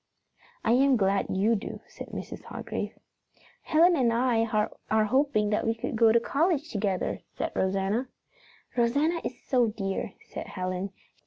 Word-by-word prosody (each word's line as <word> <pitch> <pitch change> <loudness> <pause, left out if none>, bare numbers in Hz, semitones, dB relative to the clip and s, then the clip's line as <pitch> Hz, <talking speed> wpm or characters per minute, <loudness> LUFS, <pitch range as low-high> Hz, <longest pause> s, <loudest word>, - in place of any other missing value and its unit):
"I 225 - +2
am 265 +1 +5
glad 195 -1 +2
you 205 +5 +2
do," 200 - -5
said - - -9
Mrs. - - -7
Hargrave. - - -5 0.6
"Helen 340 +3 +4
and 250 -6 +3
I 230 -1 +2 0.4
are 220 0 +3
hoping 220 -3 +2
that 210 - +1
we 225 - +2
can 225 - -4
go 225 0 +5
to 235 - +5
college 315 +5 0
together," 200 -3 -1 0.2
said - - -2
Rosanna. 195 +6 0 0.7
"Rosanna 285 +8 +2
is - - -5
so 250 -4 +3
dear," 195 -3 -3
said - - -7
Helen. 185 +1 -3
230 Hz, 150 wpm, -28 LUFS, 200-265 Hz, 0.7 s, am